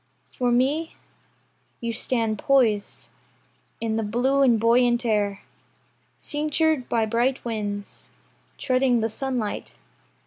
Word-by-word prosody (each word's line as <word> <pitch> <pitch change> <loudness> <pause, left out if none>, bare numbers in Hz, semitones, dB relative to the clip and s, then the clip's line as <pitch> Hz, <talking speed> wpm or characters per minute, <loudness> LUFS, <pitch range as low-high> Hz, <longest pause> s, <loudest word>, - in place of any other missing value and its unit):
For 245 -1 0
me, 280 +7 +1 0.8
You 235 -1 -3
stand 225 -2 -1
poised 235 -7 +1 0.7
In 225 -1 -1
the 225 - -1
blue 250 +6 +1
and 240 -5 +4
buoyant 240 +1 +3
air, 205 -3 0 0.8
Cinctured 305 -2 0
by 225 -2 +1
bright 240 +4 0
winds, 205 -3 -5 0.5
Treading 255 -2 +2
the 225 - 0
sunlight. 245 -2 -4
240 Hz, 105 wpm, -24 LUFS, 220-265 Hz, 0.8 s, and